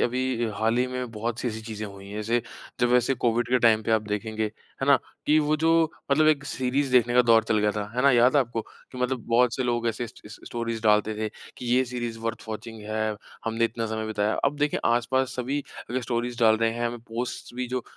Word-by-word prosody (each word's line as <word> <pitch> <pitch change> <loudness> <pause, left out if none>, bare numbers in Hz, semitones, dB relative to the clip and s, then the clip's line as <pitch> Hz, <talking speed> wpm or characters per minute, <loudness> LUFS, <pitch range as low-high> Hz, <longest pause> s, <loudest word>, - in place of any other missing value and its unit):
अभी 125 -1 0
हाल 110 +3 +1
ही 125 - +2
में 125 -1 -4
बहुत-सी 115 +3 -2
ऐसी 110 -1 -5
चीज़ें 110 -1 -5
हुई 100 -1 -11
हैं, 100 - -7
जैसे 115 +2 +1 0.4
जब 120 0 +3
ऐसे 125 +2 +2
कोविड 120 -1 0
के 125 +1 +3
टाइम 115 -2 +4
पे 115 - -3
आप 110 -1 +3
देखेंगे, 110 +1 -2 0.4
है - - +1
ना? 140 -1 +7 0.3
कि 155 +1 +5
वो 150 0 +2
जो 160 +2 +2 0.4
मतलब 155 +2 +4
एक 145 -2 +2
सीरीज़ 130 +1 -1
देखने 120 -1 +4
का 125 - +7
दौर 115 -2 +5
चल 110 -1 +1
गया 105 0 +2
था, 105 0 -4
है 125 - 0
ना? 140 - +6
याद 125 +1 +5
है - - +6
आपको? 120 -3 -2
कि 125 - -15
मतलब 125 -1 -1
बहुत 120 +1 +3
से 130 - -1
लोग 120 -1 0
ऐसे 115 +2 -2
स - - -13
स 105 - -10
स्टोरीज़ 115 -1 -4
डालते 105 0 +3
थे 110 0 -2 0.3
कि 125 - -7
ये 125 +2 +3
सीरीज़ 120 -2 -4
वर्थ 115 0 -4
वाचिंग 110 +1 -6
है, 110 0 -2 0.3
हमने 115 +1 +1
इतना 115 0 -2
समय 110 0 -3
बिताया। 105 0 0
अब 145 - +1
देखिए 150 0 +1
आसपास 125 +2 +1
सभी 130 +3 -1 0.3
अगर 130 +1 0
स्टोरीज़ 120 0 -2
डाल 110 -1 +6
रहे 115 +1 +2
हैं, 120 +1 -1
हमें 120 +1 -4
पोस्ट्स 120 +2 -4
भी 125 0 -3
जो 125 0 -2
120 Hz, 235 wpm, -26 LUFS, 110-125 Hz, 0.4 s, ना